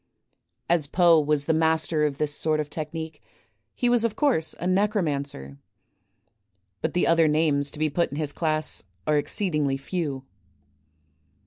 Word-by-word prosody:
As 165 Hz, -4 st, +2 dB
Poe 170 Hz, +1 st, +4 dB
was 150 Hz, -1 st, 0 dB
the 160 Hz, -, +1 dB
master 160 Hz, -1 st, +1 dB
of 140 Hz, -2 st, -6 dB
this 150 Hz, -1 st, -1 dB
sort 155 Hz, 0 st, +1 dB
of 150 Hz, -1 st, -4 dB
technique, 160 Hz, 0 st, -6 dB, 0.5 s
he 245 Hz, -, 0 dB
was 240 Hz, -1 st, +3 dB
of 230 Hz, -2 st, -1 dB
course 255 Hz, -, 0 dB
a -, -, -4 dB
necromancer; 150 Hz, -, -1 dB, 1.2 s
but -, -, -3 dB
the 180 Hz, -, +2 dB
other 165 Hz, -1 st, +4 dB
names 150 Hz, -2 st, +1 dB
to -, -, -9 dB
be 155 Hz, +1 st, +1 dB
put 170 Hz, +4 st, 0 dB
in -, -, -7 dB
his 150 Hz, -2 st, -1 dB
class 155 Hz, -1 st, +1 dB, 0.2 s
are 150 Hz, -1 st, +2 dB
exceedingly 150 Hz, -6 st, 0 dB
few. 140 Hz, -3 st, -4 dB
155 Hz, 150 wpm, -25 LUFS, 145-170 Hz, 1.2 s, Poe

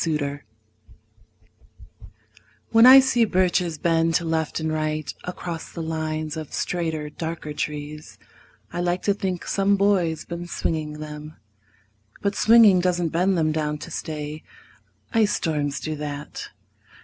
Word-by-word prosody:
BIRCHES 145 Hz, -3 st, -1 dB, 2.3 s
When 225 Hz, +2 st, +7 dB
I 265 Hz, +1 st, +11 dB
see 260 Hz, -3 st, +3 dB
birches 180 Hz, -4 st, +1 dB
bend 165 Hz, 0 st, +2 dB
to 170 Hz, -, +1 dB
left 160 Hz, -1 st, -1 dB
and 160 Hz, 0 st, -2 dB
right 155 Hz, -1 st, -2 dB
Across 175 Hz, -2 st, -6 dB
the 165 Hz, -, -5 dB
lines 155 Hz, -1 st, -3 dB
of 155 Hz, -2 st, -6 dB
straighter 160 Hz, -4 st, -2 dB
darker 160 Hz, -1 st, -5 dB
trees, 150 Hz, +1 st, -5 dB, 0.6 s
I -, -, -3 dB
like 175 Hz, +1 st, -1 dB
to 200 Hz, -, +3 dB
think 190 Hz, -3 st, -3 dB
some 200 Hz, 0 st, +2 dB
boy's 190 Hz, -5 st, +1 dB
been 170 Hz, 0 st, -6 dB
swinging 155 Hz, -3 st, -2 dB
them. 150 Hz, 0 st, -8 dB, 0.9 s
But 200 Hz, 0 st, 0 dB
swinging 220 Hz, -4 st, +6 dB
doesn't 175 Hz, -2 st, +1 dB
bend 180 Hz, +3 st, +1 dB
them 155 Hz, -1 st, +2 dB
down 150 Hz, -1 st, -1 dB
to 165 Hz, -, -9 dB
stay. 150 Hz, -1 st, -5 dB, 0.7 s
Ice 215 Hz, -3 st, +3 dB
storms 145 Hz, -3 st, -1 dB
do 155 Hz, -1 st, -4 dB
that. 145 Hz, 0 st, -6 dB
160 Hz, 135 wpm, -24 LUFS, 155-180 Hz, 2.3 s, I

